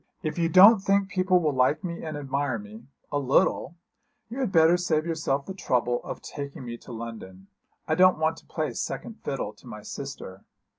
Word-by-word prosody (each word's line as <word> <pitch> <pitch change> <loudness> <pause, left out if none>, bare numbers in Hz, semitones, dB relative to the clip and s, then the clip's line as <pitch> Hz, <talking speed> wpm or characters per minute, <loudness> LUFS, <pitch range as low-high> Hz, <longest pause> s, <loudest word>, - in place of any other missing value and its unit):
'If 155 +1 -3
you 165 -1 +2
don't 195 +6 +8
think 195 0 +1
people 185 -1 +2
will 155 -4 0
like 130 +7 +2
me 170 -2 -5
and 155 -2 -5
admire 140 -3 -2
me 110 +3 -11 0.2
a 145 - 0
little 140 +3 +1 0.6
you 250 - -5
had 255 -7 -1
better 165 0 +5
save 165 -3 0
yourself 155 -4 -1
the 190 - -6
trouble 125 -9 0
of - - -7
taking 140 -3 -7
me 120 -1 -5
to 125 - -13
London. 110 -5 -8 0.4
I - - +1
don't 185 0 +5
want 160 +1 0
to - - -17
play 155 -2 -3
second 230 - -5
fiddle 130 -6 -3
to 110 - -18
my 105 -3 -9
sister.' 105 -7 -8
150 Hz, 195 wpm, -26 LUFS, 125-175 Hz, 0.6 s, don't